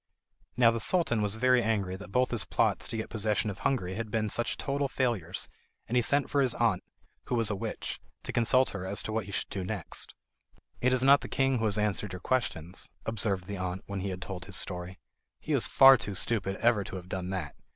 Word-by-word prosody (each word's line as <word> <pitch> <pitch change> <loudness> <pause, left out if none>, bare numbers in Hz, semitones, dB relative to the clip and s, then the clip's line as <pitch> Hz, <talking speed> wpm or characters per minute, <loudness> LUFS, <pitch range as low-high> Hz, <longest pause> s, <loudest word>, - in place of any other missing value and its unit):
Now 120 -2 +6
the 115 - -2
Sultan 120 -6 +1
was 105 0 0
very 125 +2 +4
angry 105 -5 0
that 95 0 -10
both 125 +2 +2
his 120 -4 +1
plots - - +1
to 115 - -4
get 110 - -5
possession 110 -1 0
of 95 - -10
Hungary 95 -9 0
had 110 +2 -4
been 110 -1 -1
such 120 - 0
total 140 0 -1
failures, 120 -11 -2 0.4
and 120 - -2
he 125 - +5
sent 140 +4 +2
for 140 - +1
his 130 -3 +1
aunt, 115 -6 +1 0.4
who - - -1
was 115 -3 +1
a - - -1
witch, - - -5 0.2
to - - -3
consult 130 +3 +3
her 95 -3 -5
as 95 +2 +1
to - - -4
what 110 -2 -1
he - - -7
should - - -3
do 95 - -4
next. 95 -3 -5 0.7
"It 125 - +3
is 130 0 +2
not 140 +1 +6
the - - -6
king 135 -2 +1
who 110 - 0
has 105 -1 +2
answered 105 -2 -1
your 90 - -5
questions," 90 -9 -2 0.2
observed 100 -4 -1
the 100 +1 -5
aunt, 90 0 -4
when 100 -1 -4
he 100 +1 -3
had 95 0 -5
told 90 -2 -6
his 100 - -7
story. 90 0 -1 0.4
"He - - -3
is - - +2
far 135 0 +8
too 100 -2 -5
stupid 95 -1 +2
ever 115 -2 +2
to - - -7
have 90 -1 -7
done 95 -1 -4
that! 90 -7 -4
105 Hz, 235 wpm, -29 LUFS, 95-120 Hz, 0.7 s, far